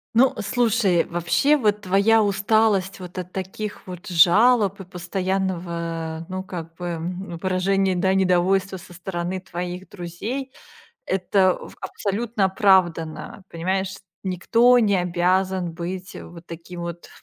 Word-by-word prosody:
Ну, 260 +2 +5
э, 215 - -4
слушай, 210 -4 +2
вообще, 175 - +2
вот 210 -4 +1
твоя 200 +4 +4
усталость 200 -1 +2
вот 180 0 -10
от 180 0 -5
таких 195 +2 -6
вот 180 -1 -8
жалоб 200 +4 +4
и - - -7
постоянного, 175 -3 -3
ну 185 0 -4
как 165 -3 -8
бы, 175 +1 -7
м, 175 +1 -5
выражения, 190 0 +1
да, 190 +2 +2
недовольства 190 +1 +2
со 175 0 -14
стороны 180 0 -4
твоих 180 0 -6
друзей- 210 +10 -5 0.5
это 185 0 +2
в - - -11
абсолютно 205 +2 -1
оправдано. 185 -3 +1
Понимаешь, 190 +3 -2 0.3
никто 230 +7 +4
не 205 -3 +3
обязан 180 0 0
быть 180 +2 -6
вот 170 0 -11
таким 170 +1 -9
вот 170 0 -7
185 Hz, 130 wpm, -23 LUFS, 175-200 Hz, 0.5 s, Ну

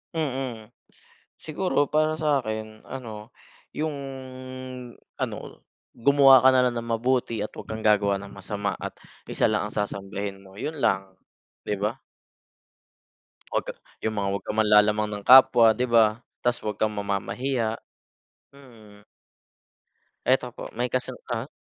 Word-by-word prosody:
Mm. 130 -7 -3 0.7
Siguro 155 -3 0
para 155 +1 +1
sa 150 -3 +2
'kin 110 0 -5
ano, 110 -5 -8 0.5
yung 155 -1 -2 1.2
ano - - -2 0.6
gumawa 135 0 +6
ka - - +9
na 130 - +5
lang 120 - -5
ng 115 0 -8
mabuti 120 -2 0
at - - -4
'wag - - -9
kang 110 - -4
gagawa 100 -2 +3
ng 100 0 -10
masama 100 +1 -3
at - - -6 0.4
isa - - +1
lang - - 0
ang - - -13
sasambahin 100 -1 -4
mo 95 +1 -16
yun 155 +1 -4
lang, 95 -7 0 0.5
'di 105 - -1
ba? 105 +5 -1 1.6
Huwag - - 0
ka - - -4 0.3
yung 110 -1 -1
mga 100 - -1
wag 100 - -3
kang 105 - -4
manlalamang 105 0 +4
ng 105 -1 -6
kapwa 130 -3 +8
'di 125 +3 -1
ba, 115 -1 +4 0.2
tas 120 0 +1
wag 105 -2 -2
kang 110 0 0
mamamahiya 110 +4 -2 0.8
mm. 110 -7 -16 1.2
Eto 130 -1 +2
po - - -8
may 125 +1 -1
kasang 130 0 -3
ah. 120 +2 -2
110 Hz, 140 wpm, -25 LUFS, 105-130 Hz, 1.6 s, ka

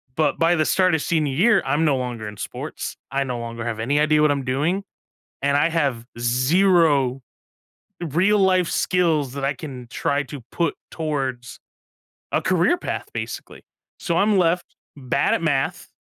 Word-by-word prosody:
But 150 -3 +1
by 165 +1 +4
the 155 -2 +1
start 185 -3 +3
of 160 - -1
senior 155 -4 0
year, 210 - +4
I'm 145 +4 +1
no 145 -4 +3
longer 120 -3 -4
in 105 -1 -7
sports. - - -6 0.2
I 140 0 0
no 125 -2 -3
longer 115 0 -6
have 115 -2 -3
any 140 +6 +1
idea 150 0 +3
what 150 -1 +4
I'm 140 -2 -2
doing, 155 +10 0 0.6
and 140 +1 +2
I 145 - +3
have 140 -8 -1
0 135 +2 +3 0.9
real 195 +8 +3
life 185 -2 +3
skills 160 -7 +1
that 140 -1 -4
I 140 +1 0
can 130 -3 -8
try 140 +3 -1
to 145 0 -8
put 170 -2 0 0.2
towards 135 -6 -4 0.7
a - - +1
career 185 - +2
path, 360 - -4
basically. - - -6 0.4
So 170 - -1
I'm 200 +3 +3
left 175 0 +1 0.2
bad 140 0 +1
at - - 0
math. 140 -5 -1
145 Hz, 170 wpm, -22 LUFS, 130-170 Hz, 0.9 s, by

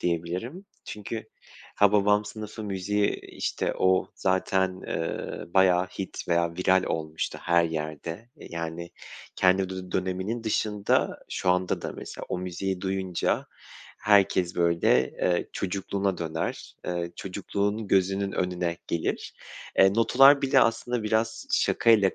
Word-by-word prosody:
diyebilirim. 90 - -3 0.2
Çünkü 110 +1 -6 0.5
Hababam 105 0 +4
Sınıfı 110 +1 -7
müziği, 100 +1 0
işte, - - -3
o 95 0 +3
zaten, 95 0 0
eee, 85 +1 -4
bayağı 95 -1 +5
hit 95 0 -7
veya 85 -1 +1
viral 95 0 +3
olmuştu 80 0 -3
her 85 -1 +3
yerde. 80 -1 -4 0.3
E, - - -13
yani, 85 0 -5 0.5
kendi 95 0 +3
dü 95 -1 -7
döneminin 95 +5 -2
dışında 105 -1 +1
şu 90 - 0
anda 90 0 0
da - - -4
mesela - - -8
o - - -2
müziği 90 +1 -3
duyunca 95 -2 -1 0.5
herkes, 95 -3 +3
böyle, 85 -7 +3
eee, 90 -1 0
çocukluğuna 100 0 -2
döner, 80 -1 -4
eee, 85 -1 -2
çocukluğunu 100 +2 -2
gözünün 95 +1 +2
önüne 90 -1 -1
gelir. 85 - -2 0.4
Eee, 95 +1 +6
notalar 135 +5 +6
bile 135 - +4
aslında 120 +1 +1
biraz 110 +1 -1
şakayla 110 -5 +4
95 Hz, 120 wpm, -27 LUFS, 90-105 Hz, 0.5 s, Eee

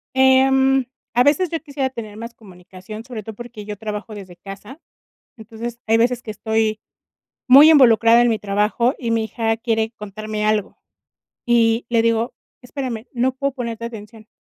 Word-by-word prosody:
Em, 265 0 +4 0.3
a 245 +1 +4
veces 300 +5 +2
yo 330 - -3
quisiera 280 -3 -3
tener 215 -5 -9
más 230 +1 -8
comunicación, 190 +1 -12
sobre 235 -4 -8
todo 220 -1 -9
porque 240 -3 -10
yo 210 0 -7
trabajo 215 +1 -6
desde 190 -3 -11
casa, 200 - -11 0.6
entonces, 230 +2 -8
hay 225 - +3
veces 240 +1 +1
que 225 - -8
estoy 220 0 -1 0.7
muy 280 +5 +9
involucrada 235 -5 +6
en 240 - +3
mi 220 -2 0
trabajo, 210 +5 0
y 235 -3 -3
mi 225 -1 0
hija 225 0 -1
quiere 225 -1 -1
contarme 210 +1 -5
algo, 215 -1 -1 0.7
y 230 -1 +2
le 230 -1 +2
digo: 230 +1 0 0.3
"Espérame, 245 -3 -6
no 255 +1 0
puedo 275 +1 -2
ponerte 235 -3 -5
atención". 220 -1 -11
230 Hz, 160 wpm, -20 LUFS, 215-250 Hz, 0.7 s, muy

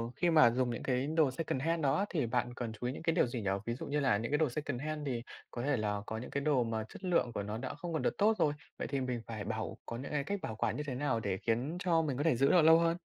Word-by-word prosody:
khi 175 - +2
mà 155 -7 +7
dùng 125 +1 +1
những 120 - -4
cái 130 +1 0
đồ 155 -3 +3
secondhand 160 +3 -1
đó 135 -1 +3
á 200 - +1
thì 155 -8 0
bạn 120 +1 -1
cần 120 -2 -4
chú 120 +3 -4
ý 125 - -2
những - - -8
cái 165 -1 +1
điều 175 - +4
gì 120 -1 -4
nhỉ? 100 - -1 0.2
Ví 115 - -1
dụ - - -6
như 145 +1 0
là 130 -7 +3
những 115 +5 -3
cái 150 - +3
đồ 155 -4 +2
secondhand 150 +2 -3
thì 120 -3 -2 0.3
có 120 - -4
thể 140 0 +1
là 105 -2 -1
có 110 - -4
những 120 - -6
cái 140 - -1
đồ 140 -4 +3
mà 110 -1 -2
chất - - -12
lượng 175 -9 +2
của 100 - -2
nó 105 +2 -4
đã 130 +2 -4
không 165 +3 -5
còn 160 - 0
được - - 0
tốt 215 +1 +4
rồi, 150 -4 +2 0.2
vậy - - -3
thì 140 -2 -1
mình 125 -2 -2
phải 110 -3 -5
bảo 110 +1 -4
có 115 - -5
những 135 +4 -6
cái 145 -2 0
cách 200 +6 -2
bảo 110 - -4
quản - - 0
như 150 - -2
thế 130 - -2
nào 130 -3 0
để 100 -4 -2
khiến 120 - -1
cho 170 -3 +3
mình 145 -5 -2
có 145 - 0
thể 165 -5 +3
giữ 135 +3 +4
được 175 - +6
lâu 160 +1 +7
hơn? 170 0 +2
135 Hz, 320 wpm, -33 LUFS, 120-155 Hz, 0.3 s, mà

